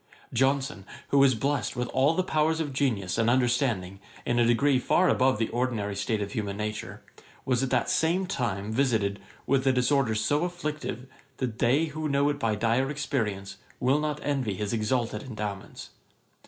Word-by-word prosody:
Johnson, 135 -3 +1 0.3
who 140 - +4
was 135 -2 +5
blest 140 +4 -1
with 125 0 -2
all 140 +5 +2
the 185 - +1
powers 160 -2 +1
of 150 -4 -2
genius 115 -8 0
and 115 0 +3
understanding 120 -7 +1 0.3
in 120 0 +1
a 120 - +4
degree 130 +3 +3
far 180 +8 +3
above 130 -3 +3
the 115 0 0
ordinary 115 -5 -1
state 105 +1 -1
of 100 - -6
human 100 -2 -3
nature, 105 0 -5 0.4
was 125 -2 +1
at 135 - 0
the - - +2
same 170 +4 +1
time 110 - -2
visited 110 -5 +1 0.3
with 135 0 +2
a - - +6
disorder 125 -2 +2
so 145 +9 +1
afflictive, 155 -8 -4 0.3
that 120 -3 -3
they 135 +7 +3
who 155 0 -4
know 140 +1 +2
it 145 -1 -2
by 110 -4 +1
dire 115 +5 +1
experience, 115 -10 -3 0.2
will 135 +4 +2
not 150 -1 -2
envy 135 -8 -1
his 105 +2 -3
exalted 115 0 -1
endowments. 105 -6 -6
125 Hz, 175 wpm, -27 LUFS, 110-140 Hz, 0.4 s, a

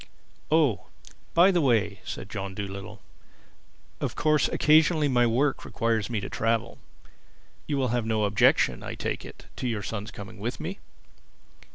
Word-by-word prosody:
"Oh, 150 - +2 0.5
by 175 +4 +7
the 175 -2 +2
way," 110 -7 +2
said - - -6
John 100 -2 -5
Dolittle, 100 -1 -7 1.0
"of - - -3
course 155 -3 +2
occasionally 155 0 +4
my 120 -3 +3
work 135 +5 +1
requires 115 -2 -1
me 115 -3 -1
to 100 - -5
travel. 115 0 -1 0.9
You 145 - -1
will 130 -2 +1
have 120 -1 -1
no 110 -1 +1
objection, 100 0 +3
I - - -6
take - - -3
it, - - -12
to 125 - -2
your 110 -4 -2
son's 105 +1 -5
coming 100 +1 -10
with 120 +5 -4
me?" 175 +5 -5
115 Hz, 155 wpm, -27 LUFS, 105-145 Hz, 1.0 s, by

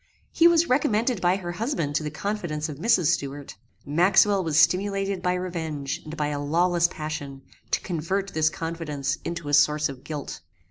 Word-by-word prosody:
He 335 - +5
was 340 0 +4
recommended 245 - +1
by 180 +1 +3
her 175 -3 -5
husband 185 - -2
to 150 - +1
the 150 - -3
confidence 155 -2 -3
of 150 -2 -8
Mrs. 180 -5 +3
Stuart. 140 0 -4 0.3
Maxwell 190 +6 +4
was 160 -3 0
stimulated 195 +2 +2
by 180 0 +1
revenge, 160 -6 -4
and 155 +1 -8
by 150 -1 0
a 145 -1 -3
lawless 170 +3 +2
passion, 145 -4 -6 0.3
to - - +1
convert 190 +4 -3
this 155 0 +3
confidence 155 -4 -3
into 170 -3 -5
a 145 - -3
source 150 +1 +4
of 135 -2 -9
guilt. 150 -3 -6
165 Hz, 175 wpm, -25 LUFS, 150-195 Hz, 0.3 s, He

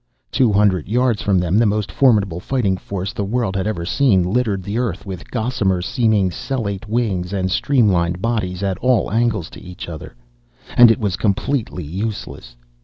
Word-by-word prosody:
Two 125 -4 +3
hundred 100 -5 +2
yards 120 -1 +1
from 100 -3 +2
them 90 +3 +2
the 115 - +4
most 105 0 -1
formidable 105 -10 +2
fighting 100 -2 0
force 95 0 -5
the 100 - -3
world 105 -1 -1
had 95 +1 -1
ever 85 -6 -3
seen 120 -3 +3
littered 100 0 0
the 100 +5 -3
earth 110 -8 -3
with 95 -3 -8
gossamer 110 -6 0
seeming 105 0 +1
cellate 115 -5 -4
wings 100 -6 -1
and 95 -1 -1
streamlined 95 -9 +2
bodies 100 -4 -2
at 95 -3 -1
all 125 -6 +1
angles 110 -6 0
to - - -11
each 90 0 -9
other. 80 -2 -8 0.6
And 120 -1 +8
it 115 - +3
was 100 -5 -1
completely 110 -2 -1
useless. 90 - -5
100 Hz, 175 wpm, -19 LUFS, 95-115 Hz, 0.6 s, And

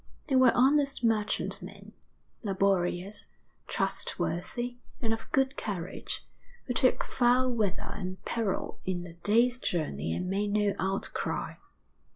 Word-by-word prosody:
They 270 - +3
were 255 -2 +7
honest 275 +1 +4
merchantmen, 220 -2 -1 0.5
laborious, 195 -1 +1 0.4
trustworthy, 240 +8 -1 0.2
and 225 -2 +1
of 225 0 -6
good 270 0 +2
courage, 190 -4 -4 0.4
who 250 - -1
took 255 +1 +3
foul 250 +1 +3
weather 210 -5 -1
and 185 -2 -6
peril 220 -5 -1
in 180 -2 -2
the 170 -1 -9
day's 230 +8 +3
journey 115 - -1
and 180 - -2
made 200 +2 0
no 210 -1 +3
outcry. 195 +1 -2
210 Hz, 120 wpm, -30 LUFS, 185-245 Hz, 0.5 s, were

